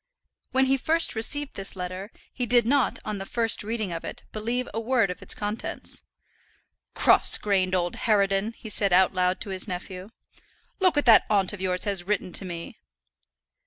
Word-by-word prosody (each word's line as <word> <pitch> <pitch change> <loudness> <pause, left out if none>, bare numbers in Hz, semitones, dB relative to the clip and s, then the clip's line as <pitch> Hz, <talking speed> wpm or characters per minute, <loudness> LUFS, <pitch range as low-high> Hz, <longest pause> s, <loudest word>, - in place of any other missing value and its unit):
When 265 0 +3
he 270 +1 +2
first 325 +5 +2
received 285 +6 -1
this 195 0 -3
letter, 185 +2 -6 0.2
he 245 -2 -3
did 240 -1 +4
not, 270 +1 +1
on 210 -2 -4
the 195 - -6
first 230 -1 +1
reading 215 -3 -3
of 165 - -5
it, - - -8
believe 235 +4 -3
a 225 - -2
word 230 -4 +1
of 180 - -9
its - - -2
contents. 210 +2 -4 0.9
"Cross - - +6
grained 185 -3 0
old 175 -1 -1
harridan," 200 0 +1
he 225 - -12
said 200 -2 +1
out 185 +1 +4
loud 185 0 +1
to 205 - -5
his 190 +2 -2
nephew. 185 +1 -7 0.7
"Look 370 -4 +3
what 290 - +1
that 230 -3 +6
aunt 200 -2 +1
of 200 - -8
yours 185 -1 0
has 195 -4 -1
written 205 -3 -1
to 195 - -2
me." 170 -2 -7
205 Hz, 185 wpm, -25 LUFS, 185-235 Hz, 0.9 s, Cross